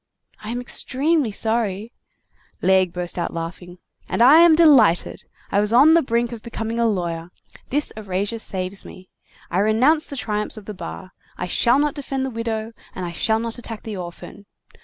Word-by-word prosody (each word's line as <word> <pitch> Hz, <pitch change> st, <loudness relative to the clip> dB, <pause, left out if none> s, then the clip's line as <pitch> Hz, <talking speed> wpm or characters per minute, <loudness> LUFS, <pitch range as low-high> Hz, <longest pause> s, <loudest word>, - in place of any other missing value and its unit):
"I 215 Hz, -, -8 dB
am 240 Hz, +1 st, -3 dB
extremely 275 Hz, +3 st, +1 dB
sorry—" 220 Hz, 0 st, -2 dB, 0.7 s
Laigle 190 Hz, -1 st, +3 dB
burst 180 Hz, 0 st, -4 dB
out 170 Hz, -, -3 dB
laughing. 175 Hz, +2 st, -7 dB, 0.3 s
"And 230 Hz, -, +2 dB
I 285 Hz, +6 st, +8 dB
am 340 Hz, -2 st, +7 dB
delighted. 270 Hz, -, +4 dB, 0.3 s
I 200 Hz, -, +2 dB
was 210 Hz, +1 st, +1 dB
on 275 Hz, +7 st, +6 dB
the 335 Hz, -, +5 dB
brink 235 Hz, -2 st, -1 dB
of 235 Hz, -2 st, -8 dB
becoming 230 Hz, 0 st, -4 dB
a 235 Hz, -, +3 dB
lawyer. 170 Hz, -5 st, -3 dB, 0.4 s
This 295 Hz, +3 st, 0 dB
erasure 205 Hz, +1 st, -3 dB
saves 190 Hz, -2 st, -3 dB
me. 185 Hz, 0 st, -13 dB, 0.4 s
I 175 Hz, -, +1 dB
renounce 255 Hz, +10 st, +3 dB
the 280 Hz, -, -7 dB
triumphs 210 Hz, -3 st, -2 dB
of 210 Hz, -, -10 dB
the 210 Hz, -, -6 dB
bar. 185 Hz, -1 st, -8 dB, 0.3 s
I 180 Hz, -, -3 dB
shall 235 Hz, +7 st, +2 dB
not 295 Hz, 0 st, +1 dB
defend 270 Hz, -3 st, -3 dB
the 265 Hz, -, -4 dB
widow, 225 Hz, -1 st, -4 dB, 0.2 s
and 185 Hz, -, -4 dB
I 170 Hz, -, -5 dB
shall 220 Hz, +6 st, 0 dB
not 230 Hz, +1 st, -4 dB
attack 225 Hz, -3 st, -8 dB
the 220 Hz, -2 st, -6 dB
orphan. 180 Hz, +2 st, -9 dB
220 Hz, 180 wpm, -21 LUFS, 190-245 Hz, 0.7 s, I